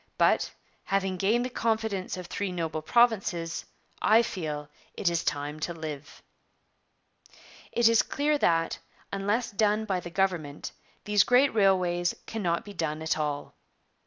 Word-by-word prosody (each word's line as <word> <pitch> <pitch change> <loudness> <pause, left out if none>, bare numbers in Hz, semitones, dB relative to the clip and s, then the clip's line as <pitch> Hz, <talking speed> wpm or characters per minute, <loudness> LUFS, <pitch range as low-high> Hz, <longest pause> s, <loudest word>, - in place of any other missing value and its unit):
But, - - +3 0.3
having 195 -1 0
gained 220 +7 +2
the 255 - -4
confidence 220 -6 -1
of 180 - -6
three 195 +2 -3
noble 160 -3 -3
provinces, 190 -5 +2 0.4
I 225 +2 +5
feel 150 -8 -4 0.3
it 175 - +1
is 170 -1 0
time 145 +1 -2
to 170 +2 -3
live.' 155 -3 -7 1.5
'It 235 -1 +4
is 230 -1 +6
clear 295 +1 0
that, 165 -6 +2 0.3
unless 205 +5 0
done 210 +1 +1
by 190 -3 0
the 175 - -7
government, 170 -6 -1 0.3
these 210 -1 +4
great 255 +2 +4
railways 180 -4 +2
cannot 195 -2 -2
be 205 - -9
done 160 -3 -2
at 160 0 0
all. 145 -1 -3
185 Hz, 140 wpm, -28 LUFS, 165-220 Hz, 1.5 s, is